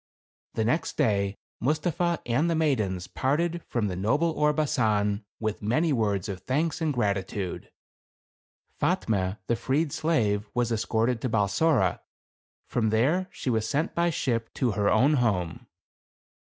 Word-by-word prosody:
The 110 - 0
next 140 +9 0
day 100 -2 +1 0.2
Mustapha 170 +5 0
and 130 +8 +1
the 165 - +1
maidens 110 - 0
parted 170 +6 -1
from 115 -4 -1
the 90 - -3
noble 140 - +1
Orbasan 120 -10 +1 0.2
with 110 -1 -2
many 145 +10 +1
words 105 -6 0
of 95 -3 -5
thanks 150 - -1
and 160 -2 +1
gratitude. 100 -5 -2 1.1
Fatme, 95 -2 0
the 120 - +1
freed 140 +6 0
slave, 110 -10 0
was 120 -1 +1
escorted 115 +1 0
to 130 - -1
Balsora. 115 - +2 0.7
From 110 -3 0
there 145 +13 +2
she 130 - -3
was 110 -1 0
sent 150 +5 0
by 170 0 +2
ship 115 -7 -1
to 125 -3 +1
her 100 0 +1
own 140 +4 +4
home. 90 -8 -1
120 Hz, 140 wpm, -27 LUFS, 105-150 Hz, 1.1 s, own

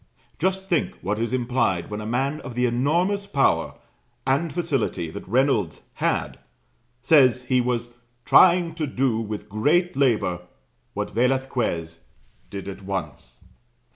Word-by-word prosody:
Just 190 +3 -1
think 170 -5 0
what 105 +3 -1
is 115 0 -1
implied 120 -8 0
when 105 0 -4
a 105 - -6
man 135 +6 -1
of 125 -3 -8
the 125 0 +1
enormous 170 +12 +1
power 140 -6 +1 0.5
and 140 +5 +1
facility 135 - -2
that - - -9
Reynolds 115 - +1 0.2
had, - - -1 0.6
says 130 -4 +5
he 125 0 +2
was 120 -1 -2 0.4
"trying 175 -2 +5
to 160 -2 -3
do 130 -4 0
with 105 -2 -5
great 150 - +1
labor" 110 -10 +1 0.5
what - - -3
Velasquez 120 -9 -1 0.5
"did 100 -1 -7
at 100 0 -7
once." 95 -11 -6
125 Hz, 135 wpm, -24 LUFS, 105-145 Hz, 0.6 s, says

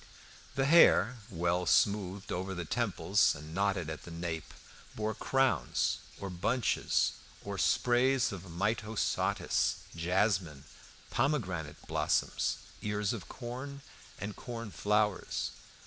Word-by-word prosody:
The 135 0 +2
hair, 125 - +6
well 90 0 0
smoothed 100 -1 +2
over 95 +2 -2
the 90 -1 -4
temples - - +2
and 75 +2 -9
knotted 100 -3 0
at 80 -1 -5
the - - -11
nape, 85 -1 -4 0.4
bore 110 0 -1
crowns, 135 +4 +1 0.2
or 100 -1 -5
bunches, 115 +8 +1 0.3
or - - -4
sprays 125 +1 +3
of 100 -4 -6
myosotis, 105 +5 0 0.2
jasmine, 90 -4 +1 0.5
pomegranate 95 - -1
blossoms, - - 0 0.2
ears 105 0 -1
of 95 -10 -7
corn, 130 +3 -6 0.4
and 100 +2 -5
corn 115 -3 -6
flowers. 105 -1 0
100 Hz, 110 wpm, -32 LUFS, 90-120 Hz, 0.5 s, hair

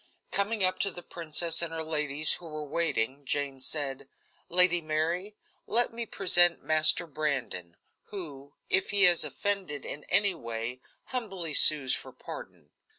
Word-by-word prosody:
Coming 200 +1 -1
up 185 0 +2
to 200 - +3
the 175 -1 -5
princess 165 0 0
and 170 -1 -1
her 165 0 -4
ladies, 150 -1 +2
who 175 - -13
were 155 -1 -7
waiting, 140 -4 -1
Jane 140 -1 -3
said: 140 -1 -3 0.4
"Lady 180 0 +5
Mary, 165 +6 -3 0.3
let 235 +1 +1
me 230 0 -6
present 175 -3 +2
Master 155 +2 +4
Brandon, 140 - -4 0.3
who, 145 -8 -10
if 190 - 0
he 200 -1 +1
has 175 -3 +6
offended 150 0 -4
in 145 - -8
any 200 0 +5
way, 115 -3 -6 0.3
humbly 195 -10 -4
sues 145 -3 +5
for - - -3
pardon." - - -12
160 Hz, 150 wpm, -27 LUFS, 145-185 Hz, 0.4 s, has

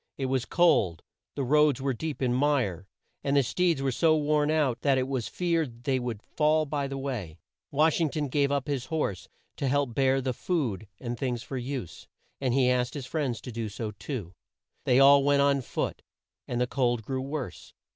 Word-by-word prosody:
It 135 - -2
was 130 -1 0
cold, 125 - +3 0.3
the 140 - -1
roads 150 0 +4
were 135 0 0
deep 145 +3 -4
in 125 -1 +2
mire, 125 - +1 0.4
and 140 0 +2
the 140 - +5
steeds 165 +2 +1
were 135 - +1
so 155 +5 +3
worn 150 0 +2
out, 150 -6 +1
that 140 -2 +3
it 130 0 0
was 130 -4 -2
feared 160 -9 -1
they 130 0 +1
would 120 -4 -4
fall 155 0 +2
by 145 -1 -2
the 135 0 -5
way. 120 - -4 0.3
Wash 155 +3 +2
ing 160 - +2
ton 150 0 -2
gave 140 +1 +1
up 140 0 -1
his 135 -4 -2
horse 130 - -2 0.3
to 140 - -1
help 140 -2 +1
bear 135 +1 +3
the 130 -1 -1
food 120 - -2
and 120 -2 -5
things 125 -3 -2
for 135 - -7
use, 125 - -5 0.3
and 130 -2 0
he 130 -2 +4
asked 125 0 +1
his 140 -3 -5
friends 130 -5 -2
to 125 - -7
do 115 -1 -4
so 105 +1 -5
too. 100 - -6 0.5
They 125 - +4
all 140 0 +7
went 140 0 +4
on 140 -1 +3
foot, 120 - -3 0.5
and 120 - -2
the 125 - +3
cold 120 -3 0
grew 130 +3 -3
worse. 135 - -6
135 Hz, 205 wpm, -28 LUFS, 120-145 Hz, 0.5 s, all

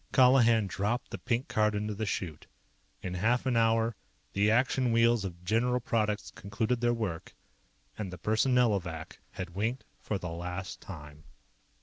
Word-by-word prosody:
_" - - -38
Colihan 120 -4 +6
dropped 105 +6 -2
the - - -5
pink 120 +2 -1
card 105 -1 +2
into 105 +1 -2
the 110 +1 -3
chute. 85 -6 -4 0.6
In 90 - -3
half 115 +8 +1
an 130 -2 +1
hour, 115 0 +3 0.4
the 100 +2 +3
Action 125 +2 +2
wheels 115 -1 +4
of 90 -2 -6
General 125 +5 +2
Products 105 -3 -1
concluded 110 +5 -2
their 120 0 +3
work, 105 -9 -3 0.6
and 100 -4 -3
the 90 - -7
Personnelovac 105 -8 +1
had 90 -1 -5
winked 110 +7 -1 0.2
for 105 - -2
the 90 -2 -5
last 90 +3 -5
time. 75 -4 -10
110 Hz, 155 wpm, -30 LUFS, 95-120 Hz, 0.6 s, Colihan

